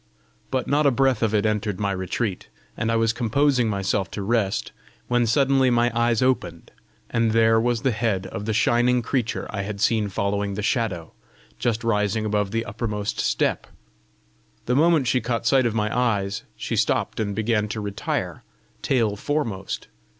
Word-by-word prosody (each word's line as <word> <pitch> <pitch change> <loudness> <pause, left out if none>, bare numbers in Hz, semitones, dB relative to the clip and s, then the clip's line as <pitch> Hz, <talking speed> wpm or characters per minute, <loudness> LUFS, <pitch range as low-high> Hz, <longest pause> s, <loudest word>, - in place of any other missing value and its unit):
But 130 -2 -1
not 145 +1 +3
a - - +7
breath 135 0 +2
of 110 -2 +2
it 105 0 +2
entered 105 -2 -1
my 100 -1 0
retreat, 95 +2 -3 0.3
and 115 0 -1
I - - +1
was 115 0 +2
composing 125 +1 +2
myself 100 -1 -1
to 100 - -3
rest, 105 -2 0 0.4
when 120 -1 +2
suddenly 135 +2 +3
my 120 0 +2
eyes 120 0 +2
opened, 90 -10 -1 0.4
and 115 -1 +1
there 115 0 +4
was 120 0 0
the 135 - +2
head 110 -4 -1
of 95 +2 -6
the 110 - -1
shining 120 +3 +2
creature 120 -2 -1
I 100 - -3
had 100 0 -5
seen 110 -1 +2
following 100 +1 -1
the 105 - -4
Shadow, 105 - -1 0.5
just 115 -1 -1
rising 105 -1 0
above 105 -1 0
the 115 +2 -2
uppermost 105 -3 -3
step! - - 0 1.0
The 125 - +1
moment 160 -1 +4
she 125 +1 +1
caught 115 0 -2
sight 130 0 +4
of 115 - -3
my 105 -1 0
eyes, 100 -5 0
she - - -3
stopped - - 0
and 100 -2 -1
began 110 -1 0
to 110 +1 -4
retire, 100 -1 -3 0.4
tail 115 -6 +1
foremost. 110 -6 -3
115 Hz, 170 wpm, -23 LUFS, 105-120 Hz, 1.0 s, a